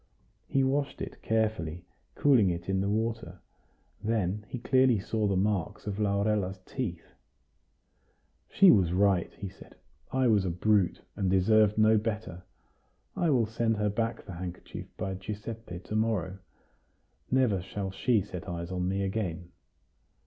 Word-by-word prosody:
He 135 - +2
washed 140 +1 0
it - - -7
carefully, 105 -7 -1 0.3
cooling 125 -9 +4
it 85 0 -4
in 95 0 +1
the 100 - 0
water; 110 -4 -2 0.6
then 105 -2 -1
he - - -4
clearly 130 -1 +3
saw 105 +2 -1
the 100 - +1
marks 95 -2 -1
of 105 0 -4
Laurella's 100 -2 +1
teeth. 100 -11 -5 1.4
"She 195 -1 +7
was 90 -5 +3
right," 95 -2 +2
he 100 - -6
said; 95 - -14 0.4
"I 130 -1 +2
was 105 -4 +4
a 95 - -1
brute, 95 +2 +1
and 95 - 0
deserved 105 +3 +4
no 110 0 +5
better. 105 -5 -4 0.7
I 170 - +1
will 125 -6 +3
send 115 0 0
her 105 0 +1
back 115 +2 -2
the 95 - -8
handkerchief 90 +1 -7
by 95 0 -3
Giuseppe 105 0 -6
to 105 - -6
morrow. 105 -4 0 0.9
Never 125 -8 +2
shall 95 +1 -5
she 110 +3 +2
set 90 -4 -7
eyes 85 0 -5
on 90 -1 -1
me 95 +1 0
again." 90 -4 -3
105 Hz, 150 wpm, -29 LUFS, 95-110 Hz, 1.4 s, She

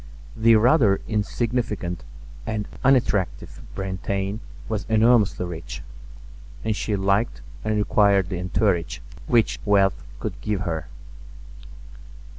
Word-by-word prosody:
The 115 +1 +5
rather 110 -3 +4
insignificant 110 -4 -2 0.4
and 105 -1 -2 0.2
unattractive 110 - +1
Brantain 95 +2 -3 0.3
was 105 -3 -3
enormously 110 -4 +4
rich; 85 -2 -7 0.8
and 110 -1 +1
she 105 0 -1
liked 100 - 0 0.2
and 110 0 0
required 100 -3 +3
the 90 - -3
entourage 90 -1 0 0.3
which 115 -2 +2
wealth 100 -2 +3 0.2
could - - -5
give 105 -3 -1
her. 80 -3 -3
105 Hz, 100 wpm, -24 LUFS, 95-110 Hz, 0.8 s, The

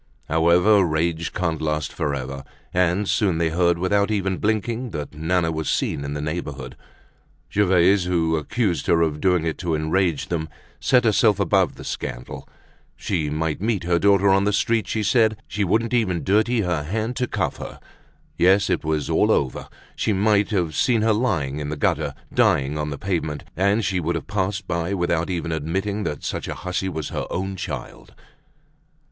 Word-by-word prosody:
However, 90 +6 +4
rage 80 0 -1
can't 80 -4 -2
last 75 -1 -2
forever, 70 -2 -3 0.3
and 90 +2 +1
soon 95 -7 +1
they 85 -1 +1
heard 85 0 +2
without 100 +3 +1
even 95 -3 0
blinking 110 +3 -1
that 75 -5 -6
Nana 80 +2 0
was 80 -2 -3
seen 70 - -1
in 70 +1 -4
the 75 - -3
neighborhood. 75 -5 -5 0.8
Gervaise, 95 -1 +4
who 85 -2 +1
accused 85 - -1
her 85 -1 +4
of 75 -2 -2
doing 90 -3 +2
it 80 -3 -2
to 85 -3 -1
enrage 80 +1 0
them, 80 -2 -2 0.3
set 125 -1 +3
herself 110 -2 +3
above 100 -4 +2
the - - -10
scandal; - - -6 0.5
she 80 -7 -2
might 80 +2 -2
meet 105 -3 0
her 85 0 +1
daughter 100 0 +4
on 95 0 +4
the 105 - +1
street, 110 -1 +1
she 110 0 -1
said; 110 -1 +3
she 105 - -2
wouldn't 110 +5 +1
even 95 -8 +1
dirty 110 +4 +2
her 90 -5 -1
hand 110 +10 -3
to 125 - 0
cuff 90 - -2
her; - - -8 0.6
yes, 95 +3 +4
it - - 0
was 75 -2 -1
all - - +2
over; 65 - 0 0.3
she 110 - 0
might 100 0 +2
have 90 -7 0
seen 115 - +2
her 110 -1 +3
lying 80 - -1
in 75 -1 -4
the 75 - -4
gutter, - - 0 0.2
dying 70 +1 +2
on 75 0 -2
the 70 - -5
pavement, 80 -6 -2
and 100 +4 +2
she 95 -1 0
would 85 +1 -1
have 85 - -4
passed 95 0 -2
by 85 +2 -1
without 85 -2 0
even 85 -2 -2
admitting 95 +7 -2
that 75 - -4
such - - -3
a - - -4
hussy 95 +1 -3
was 80 -4 -4
her - - -4
own 95 +1 -3
child. 65 -9 -7
90 Hz, 180 wpm, -23 LUFS, 80-100 Hz, 0.8 s, However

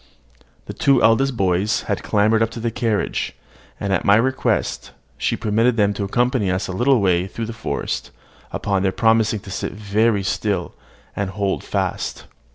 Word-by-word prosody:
The - - -7
two 135 -3 +3
eldest 120 +3 +3
boys 95 +5 +1
had 100 - -2
clambered 110 +1 +2
up 115 - +2
the 115 0 -3
carriage; 110 -2 -1 0.4
and, 100 -1 -1
at 95 - +1
my 100 - +5
request, 130 +4 0 0.2
she - - -1
permitted 115 +3 +1
them 100 -1 +3
to 100 - -4
accompany 120 0 +1
us 90 +2 -1
a - - -4
little 125 +7 +3
way 90 -2 +2
through 115 +3 -5
the 115 - -6
forest, 115 - -3 0.4
upon 100 -2 -1
their 95 -1 +1
promising 110 -1 +2
to 95 - -10
sit - - -3
very 105 0 +1
still, 95 -2 -1 0.4
and 100 -2 -2
hold 100 0 -2
fast. - - -3
105 Hz, 165 wpm, -21 LUFS, 100-115 Hz, 0.4 s, my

